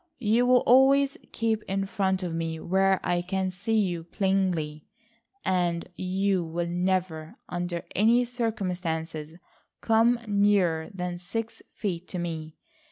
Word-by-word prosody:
You 240 +1 +2
will 250 0 +6
always 270 +2 +5 0.2
keep 225 -1 0
in 195 0 -1
front 190 -1 0
of 175 -2 -3
me 165 -1 -3
where 190 +2 +2
I 175 0 +1
can 190 +1 -2
see 200 +5 -2
you 175 -5 -1
plainly, 175 -5 -1 0.6
and 175 -2 0
you 190 +1 0
will 170 +1 -3
never, 175 -2 -1
under 175 -1 -3
any 235 +5 +4
circumstances 180 -9 -3 0.4
come 230 +2 +3
nearer 200 -6 +2
than 180 -2 -4
six 225 +5 -5
feet 180 -4 -3
to 185 - -5
me. 160 -3 -5
185 Hz, 130 wpm, -27 LUFS, 170-210 Hz, 0.6 s, will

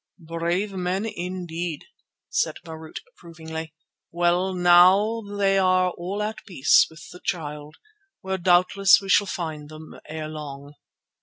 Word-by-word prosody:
"Brave 170 +4 -2
men 185 +2 -2
indeed!" 175 -5 -5 0.4
said - - 0
Marût 160 -1 -10 0.2
approvingly. 160 -1 -9 0.3
"Well, 175 +2 +1
now 185 +5 +5
they 200 -2 +1
are 185 -1 +3
all 190 +5 -4
at 215 +1 -5
peace 160 -8 +4
with 160 +1 -13
the 180 - -13
Child, 150 -2 -5 0.5
where 190 0 -3
doubtless 185 +2 +5
we 195 -1 -9
shall 205 +2 +4
find 155 -5 -5
them 155 0 -11 0.2
ere 155 0 -5
long." 145 -2 -8
175 Hz, 130 wpm, -24 LUFS, 160-190 Hz, 0.5 s, now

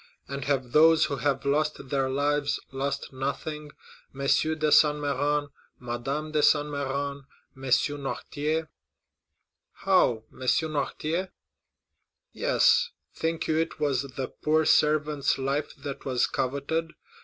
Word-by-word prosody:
And 140 -1 -5
have 130 -3 -1
those 160 +2 +6
who 140 - -3
have 140 +1 -1
lost 145 -1 0
their 135 -2 0
lives 145 +1 0
lost 135 +1 -3
nothing?—M. 145 +1 -7
de 140 - -2 0.4
Saint 150 -1 +6
Méran, 145 0 -1 0.3
Madame 135 +6 -4
de 155 -1 +1
Saint 145 0 +4
Méran, 140 -1 -3 0.3
M. 130 - -15 0.4
Noirtier——" 150 +3 -2 1.1
"How? 180 - +2
M. - - -17
Noirtier?" 155 +5 -1 1.0
"Yes; - - +3 0.2
think 165 0 -2
you 155 - +1
it 165 -1 -2
was 140 -4 +1
the 135 -1 -5
poor 155 +1 +1
servant's 150 -2 +2
life 140 +2 -1 0.3
was 130 -3 +1
coveted? 140 +5 -2
145 Hz, 115 wpm, -27 LUFS, 135-155 Hz, 1.1 s, those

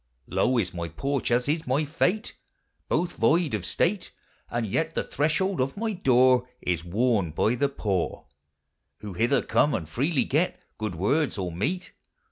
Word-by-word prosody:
Low 130 - +1
is 90 -6 0
my 85 -1 -4
porch, 135 - -2
as 125 +2 +2
is 155 +2 +1
mv 145 +1 0
fate; 180 +9 0 0.5
Both 175 0 0
void 165 -3 +3
of 105 -5 -1
state; 180 - 0 0.4
And 120 -1 -1
vet 160 +10 -1
the - - 0
threshold 160 +4 0
of 135 +6 -2
my 220 0 -1
doore 130 -6 +4
Is 85 -2 -1
worn 105 0 +1
by 95 +9 +1
the 140 +3 +1
poore, 100 -10 -2 0.8
Who 105 -2 -6
hither 120 +8 +2
come 145 -1 +2
and 80 - -4
freely 135 - +1
get 160 +7 0 0.2
Good 110 -5 -3
words 130 - +1
or 90 -3 -2
meat. 155 - -3
130 Hz, 165 wpm, -26 LUFS, 105-155 Hz, 0.8 s, doore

